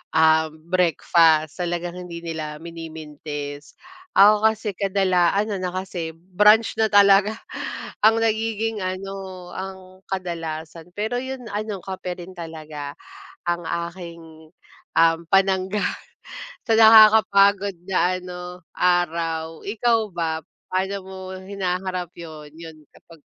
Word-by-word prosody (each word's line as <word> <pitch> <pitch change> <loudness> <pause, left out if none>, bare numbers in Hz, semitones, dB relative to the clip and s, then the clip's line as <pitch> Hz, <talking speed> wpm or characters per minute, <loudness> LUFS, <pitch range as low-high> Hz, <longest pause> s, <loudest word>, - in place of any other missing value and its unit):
um, 160 0 +4 0.2
breakfast 165 -2 +3
talagang 175 0 -3
hindi 170 0 -8
nila 155 -2 -5
minimintis. 150 -3 -8 0.4
Ako 210 +2 +7
kasi 220 -1 -1
kadala 190 -3 +2
ano 205 0 0
na 180 -1 -3
kasi 185 -3 -4
brunch 210 +7 +3
na 220 - +4
talaga, 200 +1 +5 0.7
ang 225 +1 +5
nagiging 225 0 -1
ano, 185 -1 -6
ang 190 0 -6 0.3
kadalasan. 165 -2 -5
Pero 220 +4 -1
'yun 260 -1 -6
ano, 210 -1 -3
kape 185 -1 -5
rin 180 +2 -10
talaga 155 -4 -7 0.5
ang 175 0 0
aking, 170 -2 -7 0.5
um, 165 0 +5
panangga 195 +1 +2 0.8
sa 225 - +3
nakakapagod 210 -3 +6
na 185 -1 +1
ano 180 0 -8 0.4
araw. 165 -2 0
Ikaw 230 +3 +2
ba, 165 -2 -2 0.3
paano 190 +2 0
mo 190 0 -10 0.2
hinaharap 185 -2 -3
'yun, 155 -3 -10
'yun 165 -1 -10 0.2
kapag 165 -3 -18
180 Hz, 110 wpm, -23 LUFS, 165-200 Hz, 0.8 s, Ako